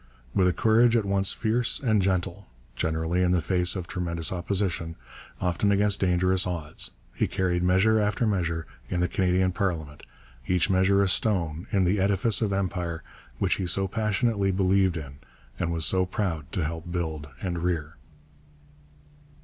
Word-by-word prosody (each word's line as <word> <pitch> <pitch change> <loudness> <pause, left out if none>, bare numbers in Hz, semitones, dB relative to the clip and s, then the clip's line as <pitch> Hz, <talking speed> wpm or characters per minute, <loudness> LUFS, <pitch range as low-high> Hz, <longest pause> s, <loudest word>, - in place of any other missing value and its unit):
With 95 - +3
a - - +4
courage 115 +4 +4
at 110 - 0
once 100 0 +2
fierce 115 +1 0
and 110 -6 +2
gentle, 95 -2 -1 0.3
generally 80 +5 -1
in 90 0 +2
the 90 - +3
face 90 +1 +1
of 90 -2 -4
tremendous 85 -3 -2
opposition, 90 -2 -2 0.4
often 90 +3 +1
against 100 0 +2
dangerous 90 0 +2
odds, 80 -4 -3 0.2
he - - 0
carried 90 -2 0
measure 95 +5 +3
after 105 +3 0
measure 85 -6 -1 0.2
in 90 - -1
the 90 - +2
Canadian 95 0 +1
Parliament, 80 -6 -3 0.5
each 90 +2 +1
measure 95 +1 +3
a - - +1
stone 90 -5 0
in 95 -2 +2
the 95 +3 +1
edifice 100 +4 +3
of 105 -3 0
empire 90 -4 -2 0.3
which - - +1
he 95 - -2
so 95 +2 +1
passionately 105 0 0
believed 95 -1 +2
in 70 -3 -8 0.4
and 85 - -1
was 80 -2 0
so 95 -1 +2
proud 85 -7 -3
to 85 - -1
help 85 +2 -5
build 80 -4 -3
and 85 -2 -3
rear. 80 -4 -2
90 Hz, 160 wpm, -26 LUFS, 85-100 Hz, 0.5 s, a